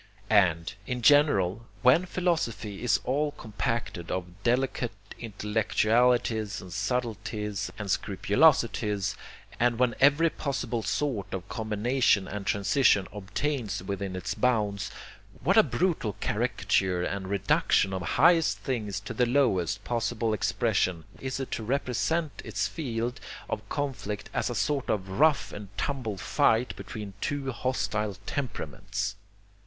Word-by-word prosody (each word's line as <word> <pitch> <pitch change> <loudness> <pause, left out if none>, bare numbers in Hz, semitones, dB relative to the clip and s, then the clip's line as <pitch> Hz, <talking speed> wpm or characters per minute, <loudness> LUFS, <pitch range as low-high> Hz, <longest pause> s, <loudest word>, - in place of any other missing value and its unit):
And, 90 -5 +3
in 125 -1 -3
general, 115 - +4 0.2
when 145 +9 +5
philosophy 155 - -1
is 125 - +2
all 145 +3 0
compacted 110 - -3
of 90 +1 -5
delicate 125 -1 0 0.3
intellectualities 110 0 +1
and 90 -2 -9
subtleties 105 -1 -2
and 105 - -5
scrupulosities, 105 -1 +2 0.4
and 120 -1 +3
when 125 -1 +2
every 145 +4 +5
possible 125 -5 -2
sort 125 -4 -2
of 95 0 -6
combination 110 -2 +1
and 105 -1 -6
transition 100 -1 +3
obtains 105 0 -3
within 100 -1 -4
its 95 +2 -3
bounds, 105 -4 0 0.5
what - - +3
a - - +9
brutal 165 - 0
caricature 100 -4 0
and 95 0 -3
reduction 95 0 +2
of 95 - -2
highest 160 - +4
things 105 -3 -3
to 105 - -6
the 125 -1 +2
lowest 105 - +1
possible 115 -1 -1
expression 90 -4 0 0.2
is 130 0 -3
it 135 - -5
to - - -2
represent 140 +6 -1
its - - -1
field 120 -5 -3 0.3
of 105 - -5
conflict 130 -8 -3
as - - 0
a 120 - -3
sort 140 +3 0
of 95 -3 0
rough 155 -1 +3
and 105 -1 -7
tumble 125 -8 -2
fight 115 +5 +2
between 105 -5 -7
two 140 -2 -2
hostile 110 -5 -1
temperaments! 105 -5 -3
110 Hz, 125 wpm, -28 LUFS, 100-130 Hz, 0.5 s, a